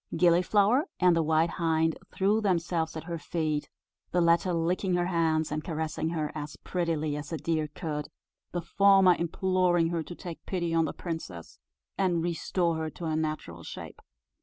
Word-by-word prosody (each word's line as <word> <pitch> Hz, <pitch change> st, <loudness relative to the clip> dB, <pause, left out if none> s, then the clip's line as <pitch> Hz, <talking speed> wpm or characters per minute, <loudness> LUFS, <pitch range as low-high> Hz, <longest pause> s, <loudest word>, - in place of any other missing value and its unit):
Gilliflower 195 Hz, -, +4 dB
and 180 Hz, -2 st, +5 dB
the 165 Hz, -, +3 dB
white 160 Hz, +1 st, +2 dB
hind 160 Hz, 0 st, +2 dB, 0.2 s
threw 205 Hz, +3 st, +2 dB
themselves 170 Hz, -4 st, 0 dB
at 160 Hz, -, -6 dB
her 170 Hz, 0 st, -5 dB
feet 155 Hz, -1 st, -2 dB, 0.4 s
the 180 Hz, -, +1 dB
latter 170 Hz, +1 st, +3 dB
licking 180 Hz, +2 st, 0 dB
her 175 Hz, 0 st, +1 dB
hands, 160 Hz, -3 st, +1 dB
and 155 Hz, 0 st, -2 dB
caressing 160 Hz, -1 st, -2 dB
her 155 Hz, -3 st, -2 dB
as 150 Hz, -1 st, -6 dB
prettily 160 Hz, -4 st, -1 dB
as 150 Hz, +1 st, -6 dB
a 165 Hz, -, -1 dB
deer 155 Hz, -1 st, -1 dB
could 150 Hz, -1 st, -4 dB, 0.4 s
the 175 Hz, -1 st, -3 dB
former 195 Hz, 0 st, +5 dB
imploring 175 Hz, 0 st, +2 dB
her 170 Hz, -1 st, -1 dB
to 175 Hz, +2 st, -8 dB
take 170 Hz, -2 st, -8 dB
pity 170 Hz, -3 st, -1 dB
on 165 Hz, -1 st, +3 dB
the -, -, -2 dB
princess, 160 Hz, -, -7 dB, 0.4 s
and 175 Hz, -4 st, +2 dB
restore 170 Hz, 0 st, 0 dB
her 160 Hz, 0 st, -2 dB
to 170 Hz, -, -8 dB
her 160 Hz, -1 st, 0 dB
natural 155 Hz, -, -3 dB
shape. -, -, -9 dB
165 Hz, 170 wpm, -28 LUFS, 160-175 Hz, 0.4 s, and